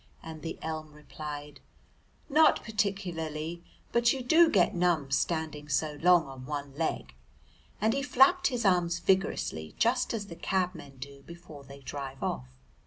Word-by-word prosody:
and 160 -1 -8
the 165 - -5
elm 155 -1 -5
replied, 150 -1 -8 0.7
"Not 310 +2 +4
particularly, 170 -6 -3 0.3
but 235 0 +4
you 265 -2 -2
do 320 +6 +6
get 185 - +3
numb 170 -6 +1
standing 155 0 -1
so 145 +1 0
long 175 -1 +5
on 130 -2 -10
one 145 -1 -4
leg," 145 - -2 0.7
and 220 +2 +2
he 275 - 0
flapped 290 +7 +4
his 245 -4 -2
arms 175 -3 +3
vigorously 185 - 0
just 245 +2 +2
as 220 -3 -3
the 170 - -9
cabmen 175 -6 -2
do 140 +1 -9
before 170 -4 -11
they 140 +1 -12
drive 135 -1 -6
off. 65 0 -2
165 Hz, 150 wpm, -29 LUFS, 145-200 Hz, 0.7 s, do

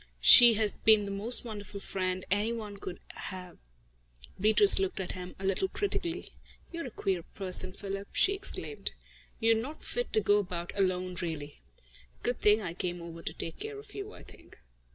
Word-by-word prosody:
She 235 - +10
has 210 -1 0
been 215 -2 +5
the 200 - -5
most 220 +6 +2
wonderful 205 -3 -7
friend 185 -1 -3
any 205 +3 +1
one 215 -3 -6
could 185 -2 -7 0.2
have." 180 -2 -8 0.8
Beatrice 210 0 +6
looked 190 0 -1
at 185 - -3
him 180 0 -8
a 190 - -6
little 195 - +1
critically. 365 -3 -3 0.4
"You're 335 -5 -5
a - - -6
queer 190 -5 -2
person, 185 +1 -2
Philip," 195 +1 -6
she 395 - +3
exclaimed. 400 +2 -4 0.5
"You're 225 0 +4
not 250 +8 -4
fit 485 0 -3
to - - +5
go 205 0 +3
about 175 -3 -4
alone, 185 -2 0
really. 155 -4 -5 0.6
Good 245 0 -1
thing 210 +1 +4
I 170 -3 -4
came 175 0 -3
over 165 -1 -9
to - - -2
take 165 - -6
care 430 0 -6
of 415 0 -12
you, 405 +1 -6
I - - -13
think." - - -17
200 Hz, 180 wpm, -30 LUFS, 185-230 Hz, 0.8 s, She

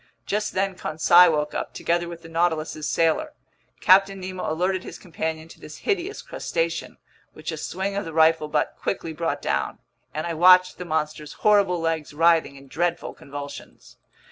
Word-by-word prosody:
Just 210 +1 -2
then 195 0 0
Conseil 175 +1 +5
woke 150 0 -1
up, - - -4
together 170 0 -1
with 170 -1 -9
the - - -10
Nautilus's 160 -2 -1
sailor. 165 - +1 0.5
Captain 195 +1 +5
Nemo 185 -3 -4
alerted 185 +3 0
his - - -9
companion 160 -3 -5
to - - -15
this 150 - -11
hideous 395 0 -1
crustacean, - - -3 0.4
which - - -6
a - - -5
swing 195 +1 -3
of 200 - -1
the 165 - -6
rifle 160 -1 +3
butt 150 - -1
quickly 165 -4 -3
brought 155 -3 -3
down, 70 0 -1 0.3
and 155 - -4
I 170 - -2
watched 180 +2 +5
the 180 - -5
monster's 155 -2 -3
horrible 200 -4 +4
legs 160 -3 -2
writhing 165 -2 +3
in 135 0 -14
dreadful 175 +4 -2
convulsions. 140 0 -10
165 Hz, 170 wpm, -24 LUFS, 155-185 Hz, 0.5 s, Conseil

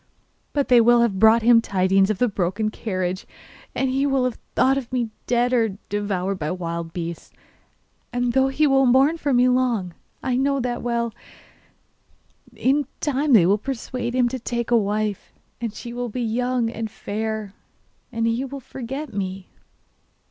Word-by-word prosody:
But 285 -2 0
they 245 -2 +7
will 240 +1 +5
have 210 -5 +1
brought 220 +2 +6
him 235 0 +6
tidings 195 -1 +2
of 215 - 0
the 245 - +2
broken 205 +2 -1
carriage, 185 -4 -3 0.5
and 265 -1 0
he 270 +2 +1
will 270 -2 +1
have 250 -2 -2 0.2
thought 265 -1 +2
me 240 -3 -1 0.2
dead, 245 +1 +2
or 225 -5 +1
devoured 195 -2 -2
by 150 -1 -2
wild 170 -2 -4
beasts. 170 -1 -6 0.8
And 245 0 0
though 265 0 +3
he 280 +3 +1
will 270 -2 +4
mourn 270 +6 +4
for 285 - -1
me 250 0 +4
long 245 -8 +1 0.3
I 255 -1 0
know 275 +1 +1
that 245 -1 -2
well 235 -1 -1 1.4
yet - - -17
in 275 +1 +3
time 290 0 +1
they 195 -7 +7
will 200 +4 +3
persuade 250 0 -4
him 250 -1 +3
to 260 +1 -4
take 235 0 -3
a - - +5
wife, 210 -1 -1 0.3
and 230 -2 -2
she 235 +3 -8
will 245 0 -3
be 245 +3 -3
young 240 +1 0
and 225 -1 -4
fair, 215 0 -4 0.6
and 230 -1 -1
he 230 +3 0
will 275 +1 -6
forget 265 +2 -7
me. 190 -1 -5
235 Hz, 170 wpm, -23 LUFS, 205-255 Hz, 1.4 s, they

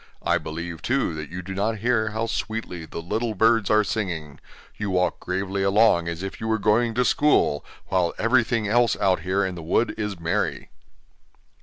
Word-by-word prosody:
I - - +2
believe, 80 +1 -6
too, 130 -9 0
that 75 -1 -6
you 90 +1 -6
do 95 +2 -6
not 105 +3 -1
hear 110 0 +1
how 110 +1 -2
sweetly 110 -7 -4
the 85 - -7
little 110 +5 -2
birds 110 0 +3
are 110 0 +4
singing; 85 -9 -3 0.4
you 105 -1 -3
walk 90 -1 +1
gravely 95 +2 -2
along 100 -3 +4
as 85 +2 -4
if 95 - -6
you 110 - -3
were 110 0 +2
going 110 +2 +2
to 125 0 +2
school, 145 - +3 0.3
while 90 -3 +1
everything 115 -2 +2
else 120 +2 +3
out 95 -1 +2
here 95 +2 0
in 95 - -3
the 85 - -7
wood 100 +8 +1
is 105 -4 -3
merry. 85 0 -2
100 Hz, 185 wpm, -24 LUFS, 90-110 Hz, 0.4 s, are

